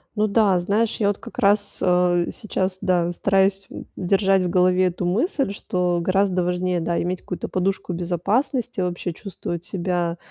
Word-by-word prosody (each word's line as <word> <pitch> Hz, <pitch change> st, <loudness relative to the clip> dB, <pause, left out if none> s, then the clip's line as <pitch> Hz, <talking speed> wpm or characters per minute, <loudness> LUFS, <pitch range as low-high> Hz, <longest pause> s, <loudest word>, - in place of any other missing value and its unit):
Ну 215 Hz, 0 st, +2 dB
да, 200 Hz, -3 st, +3 dB
знаешь, 210 Hz, +5 st, 0 dB
я 205 Hz, -, +1 dB
вот 205 Hz, 0 st, +1 dB
как 230 Hz, +2 st, -10 dB
раз, 205 Hz, -2 st, +2 dB
э, 180 Hz, -1 st, +2 dB
сейчас, 190 Hz, -3 st, -3 dB
да, 175 Hz, -2 st, +1 dB
стараюсь 195 Hz, +1 st, +1 dB, 0.3 s
держать 195 Hz, +1 st, +2 dB
в 180 Hz, -, -1 dB
голове 180 Hz, 0 st, +3 dB
эту 180 Hz, 0 st, -3 dB
мысль, 265 Hz, -, 0 dB
что 180 Hz, -3 st, -1 dB
гораздо 185 Hz, 0 st, +1 dB
важнее, 180 Hz, 0 st, 0 dB
да, 170 Hz, +1 st, -1 dB
иметь 180 Hz, +1 st, -2 dB
какую-то 180 Hz, -, -5 dB
подушку 190 Hz, 0 st, -1 dB
безопасности, 205 Hz, -, -1 dB
вообще 175 Hz, 0 st, -2 dB
чувствовать 175 Hz, -2 st, -6 dB
себя 175 Hz, -2 st, -2 dB
185 Hz, 155 wpm, -22 LUFS, 180-200 Hz, 0.3 s, да